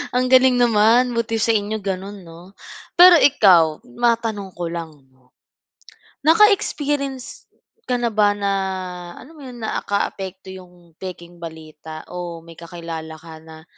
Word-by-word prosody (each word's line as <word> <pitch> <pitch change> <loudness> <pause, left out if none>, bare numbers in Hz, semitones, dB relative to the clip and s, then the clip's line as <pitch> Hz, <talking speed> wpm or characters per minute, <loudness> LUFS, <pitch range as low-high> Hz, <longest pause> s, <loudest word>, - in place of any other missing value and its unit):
Ang 255 0 +2
galing 255 -1 +5
naman, 235 +2 +3
buti 225 -1 -1
sa 225 +1 +2
inyo 210 +1 -2
ganun, 195 0 -6
'no? 170 +3 -14 0.5
Pero 360 0 +10
ikaw, 180 - +4
matanong 220 - -1
ko 175 -1 -5
lang, 165 -1 -6 0.2
'no, 130 0 -31 1.0
naka-experience 295 -8 +1 0.4
ka 250 - +1
na 240 -1 -1
ba 205 -1 +3
na, 200 -1 -1 0.6
alam 285 - -14
mo - - -13
yun, 250 -4 -10
naakaapekto 190 -3 -4
yung 180 -2 -15
pekeng 175 -2 -9
balita 160 -1 -10
o 175 -2 -7
may 170 - -13
kakilala 165 -2 -8
ka 160 0 -13
na 160 0 -14
195 Hz, 135 wpm, -20 LUFS, 170-240 Hz, 1.0 s, Pero